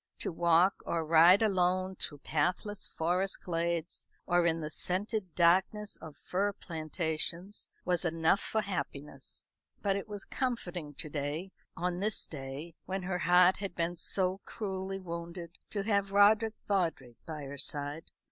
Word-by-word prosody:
To - - -2
walk 170 +3 +4
or 165 -1 0
ride 170 +6 +7
alone 185 -2 +2
through 145 -5 -5
pathless 180 +6 0
forest 180 +4 -1
glades, 170 -1 -2 0.2
or 175 -1 +3
in 165 0 +2
the 155 -1 -4
scented 185 +1 -2
darkness 190 +4 +3
of 155 -2 -10
fir 200 +2 -1
plantations, 165 +2 -3 0.2
was 180 -1 +2
enough 165 +2 +3
for 220 - 0
happiness. 150 -7 -4 0.4
But 200 -2 +2
it 200 - -3
was 205 -2 -6
comforting 180 - -3
to 155 - +1
day 150 +6 -3 0.3
on 180 0 -1
this 210 +2 0
day 140 +3 -7
when 190 0 -2
her 180 0 -1
heart 180 +1 +6
had 195 -3 -5
been 170 +1 -1
so 185 +2 0
cruelly 195 -3 -4
wounded 170 -1 -7
to 200 -2 -2
have 200 -2 +1
Roderick 215 +2 +5
Vawdrey 165 - 0
by 155 -2 -5
her 140 0 -6
side. 145 +3 -2
180 Hz, 145 wpm, -32 LUFS, 165-195 Hz, 0.4 s, ride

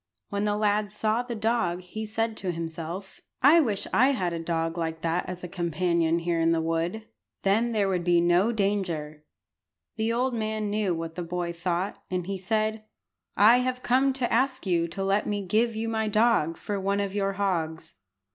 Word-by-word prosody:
When 200 +1 -1
the 205 0 +1
lad 210 -1 +1
saw 215 +2 0
the 245 -1 -5
dog 215 -6 0
he 215 +4 -6
said 225 +1 -1
to 185 -2 -2
himself 165 +3 -6 0.2
"I 300 +5 +8
wish 220 -10 0
I 260 +4 +5
had 180 -8 -1
a 165 - -3
dog 165 0 -1
like 160 -1 -3
that 170 +2 -1
as 180 -1 -6
a - - -4
companion 170 -1 0
here 170 0 -1
in 165 0 +3
the 165 - +1
wood. 165 +6 -2 0.4
Then 220 +5 +2
there 210 -3 +1
would 180 -2 0
be 175 0 +4
no 175 +6 +3
danger." 180 -8 -2 0.7
The 220 +1 0
old 250 +2 0
man 215 -2 -2
knew 205 -4 0
what 165 0 -5
the 180 - -5
boy 175 0 -3
thought, 175 +2 -2
and 180 -1 -2
he 195 0 -4
said 215 +2 -1 0.5
"I 220 +4 +7
have 255 0 -1
come 265 +2 +3
to 255 -2 -1
ask 260 +1 +1
you 170 -3 +1
to 195 +4 -4
let 195 +2 +1
me 205 -1 -2
give 220 +4 +1
you 225 +1 -2
my 220 -1 -1
dog 215 -7 +2
for 205 -1 -3
one 200 +1 0
of 200 -1 -2
your 195 -1 0
hogs." 165 -5 -2
195 Hz, 195 wpm, -27 LUFS, 170-220 Hz, 0.7 s, I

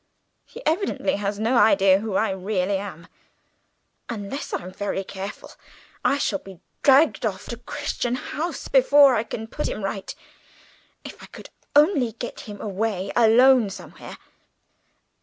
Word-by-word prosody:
He - - -12
evidently 320 - 0
has 200 0 -3
no 230 +3 +1
idea 195 -4 +5
who 210 -2 -4
I 215 0 +1
really 190 0 -1
am. 180 -5 -8 1.0
Unless 225 +4 -5
I'm 180 +1 -4
very 200 -1 -3
careful 195 +1 -8 0.5
I 280 - +2
shall 205 -8 -1
be 190 -3 -13 0.2
dragged 280 +2 +4
off 205 -3 -3
to 235 - -5
Crichton 245 -1 -3
House 320 +6 -5
before 275 +1 +6
I 220 - +2
can 225 -1 -6
put 295 +7 -4
him 215 - -5
right. 195 0 -4 0.9
If - - -10
I - - -11
could - - -13 0.2
only 290 - +4
get 240 +2 -7
him 205 -1 -8
away 200 -1 -2
alone 240 0 +5
somewhere." 195 - -10
220 Hz, 140 wpm, -23 LUFS, 195-265 Hz, 1.0 s, before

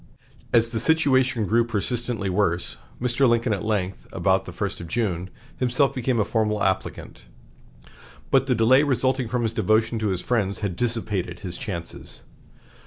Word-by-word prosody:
As 115 -1 +4
the 115 -1 -2
situation 130 -5 +2
grew 115 +3 +3
persistently 115 -1 -2
worse, 90 -2 0 0.2
Mr. 125 +1 +2
Lincoln 115 -1 +2
at 100 - -3
length, 100 -4 -2
about - - +1
the - - -7
first - - -4
of 85 - -7
June, 95 -3 -2 0.3
himself 130 +2 +2
became 125 -1 0
a 105 - +2
formal 105 -2 0
applicant. 95 -8 -2 1.1
But 135 0 +3
the 125 - +2
delay 120 +4 +5
resulting 130 -3 +1
from 125 +1 -1
his 115 -1 -1
devotion 110 +1 +1
to 110 - -1
his 95 -3 -1
friends 105 -5 -1
had 95 -4 -2
dissipated 105 -6 -2
his 90 -3 -5
chances. 95 -9 -7
115 Hz, 160 wpm, -24 LUFS, 100-125 Hz, 1.1 s, delay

